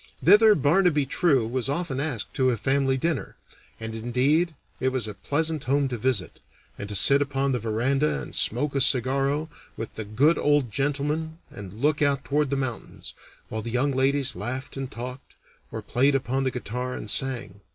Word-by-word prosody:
Thither 210 +3 +7
Barnaby 150 0 +2
True 135 -3 +2
was 130 +2 -2
often 145 -2 -2
asked 135 -8 -3
to 130 -1 +2
a 120 - 0
family 135 +3 +1
dinner; 160 0 -2 0.4
and, 110 0 -5
indeed, 130 +9 +1 0.2
it 130 - +1
was 130 -4 -2
a 105 - -5
pleasant 155 +6 -2
home 140 +2 +1
to 125 - -3
visit, 115 -6 -1 0.4
and 100 - -7
to 105 - -4
sit 140 +9 +5
upon 140 -1 0
the 125 - 0
veranda 120 - 0
and - - -8
smoke 140 +6 +1
a 140 - 0
cigarro 135 +3 +2 0.3
with 115 - -6
the 110 - -5
good 130 +11 +2
old 145 -5 +2
gentleman 145 +4 -2
and 100 -2 -9
look 150 0 +2
out 140 -2 +1
toward 145 0 0
the 140 - 0
mountains, 130 -4 -5 0.4
while 110 - -4
the 115 - -6
young 125 +4 +1
ladies 135 0 +1
laughed 130 +2 -5
and 135 -1 -5
talked, 125 +1 -8 0.4
or - - -6
played 135 +3 +2
upon 135 0 -1
the - - +2
guitar 125 +1 -4
and 105 - -3
sang. 115 -7 0
135 Hz, 185 wpm, -25 LUFS, 120-145 Hz, 0.4 s, Thither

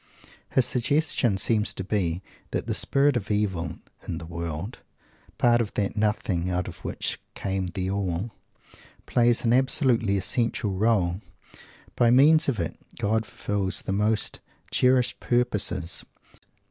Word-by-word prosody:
His 130 - +3
suggestion 130 -4 +1
seems 105 +2 +1
to - - -3
be 95 -3 -1 0.3
that - - -2
the - - -1
spirit 140 0 +2
of 110 -5 -2
Evil 95 -6 -1 0.3
in - - -3
the 85 - -7
world 85 +6 -5 0.6
"part 120 -1 +4
of 110 - -4
that 100 -1 -1
Nothing 105 -4 0
out 90 0 -1
of - - -8
which - - -3 0.2
came 95 -1 -2
the 95 +2 -3
All" 100 +2 -2 0.7
plays 120 -1 +2
an 115 - +3
absolutely 125 -6 +3
essential 105 +2 0
role. 95 -2 +1 0.7
"By 120 - +4
means 150 +5 +6
of 120 - -1
it 85 - -3 0.2
God 110 +2 0
fulfils 95 -3 -2
his - - -9
most 105 +2 +1 0.3
cherished 125 -1 +2
purposes." 105 -8 0
105 Hz, 135 wpm, -26 LUFS, 95-120 Hz, 0.7 s, means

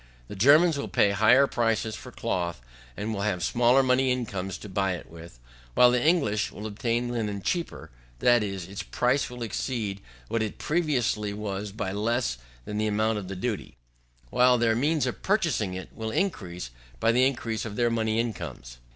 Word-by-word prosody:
The - - -7
Germans 145 - +5
will - - -3
pay 100 - +3
higher 110 +7 +5
price 115 -4 0
for - - -9
cloth, 85 -5 -2 0.4
and 110 +2 -3
will 100 - -3
have 100 -4 -1
smaller 120 +3 +4
money 130 0 +3
incomes 100 -7 -3
to - - -10
buy 95 -1 0
it 90 - -8
with; 85 -6 -12 0.4
while 125 0 +7
the 125 0 +1
English 140 -11 +2
will 105 - -8
obtain 115 +3 -1
linen 110 -4 -2
cheaper, 170 - -3 0.3
that 120 - +4
is, 95 -4 -4
its 100 +1 -6
price 125 +3 0
will 125 -1 -6
exceed 110 -3 -3 0.3
what 115 0 -1
it 110 -2 -3
previously 125 -10 0
was 100 -1 -4
by 95 -2 -3
less 110 - -1 0.3
than 105 0 -4
the 110 - +1
amount 110 +1 +1
of 95 - -7
the 95 - -5
duty, 105 +3 -4 0.5
while 125 0 +5
their 115 -1 +2
means 150 +4 +1
of 125 - -4
purchasing 150 - 0
it 95 - -7
will 110 -1 -4
be - - -3
increased 90 - -3 0.3
by 115 - +3
the 125 +2 +3
increase 115 -4 -3
of 110 -3 -6
their 120 0 +2
money 110 -1 0
incomes. 65 - -5
110 Hz, 185 wpm, -27 LUFS, 100-125 Hz, 0.5 s, while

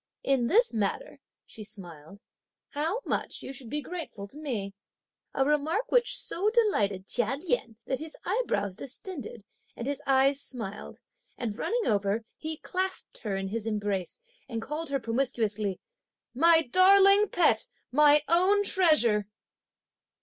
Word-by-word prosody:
"In 265 -3 +1
this 455 - +3
matter," 220 - -2 0.3
she 215 - -10
smiled, 190 -3 -9 0.5
"how 325 +11 -2
much - - -2
you 265 - -6
should 250 -3 -8
be 300 +4 -1
grateful 300 - -7
to 290 - -8
me!" 220 -10 -4 0.6
A 270 - +2
remark 300 - 0
which - - +3
so 400 -1 0
delighted 210 - +1
Chia 240 +5 0
Lien 300 - -2
that 265 - -2
his 315 +1 -7
eyebrows 340 - -1
distended, 270 - -7 0.3
and 235 - -6
his 285 +1 -3
eyes 275 +1 +3
smiled, 225 -8 -6 0.4
and 220 -4 -3
running 460 - -1
over, 205 +2 0
he 315 0 -4
clasped 375 +3 -4
her 205 -4 -3
in 195 0 -3
his 225 +1 -3
embrace, 205 -4 -2 0.3
and 230 -2 -3
called 300 +6 -5
her 275 -1 0
promiscuously: 225 -5 -1 0.5
"My 325 +5 +5
darling, 390 +7 +6
my 420 - +2
pet, 305 - +2 0.2
my 295 +2 +5
own 375 +5 +4
treasure!" 300 - +4
270 Hz, 140 wpm, -28 LUFS, 215-345 Hz, 0.6 s, darling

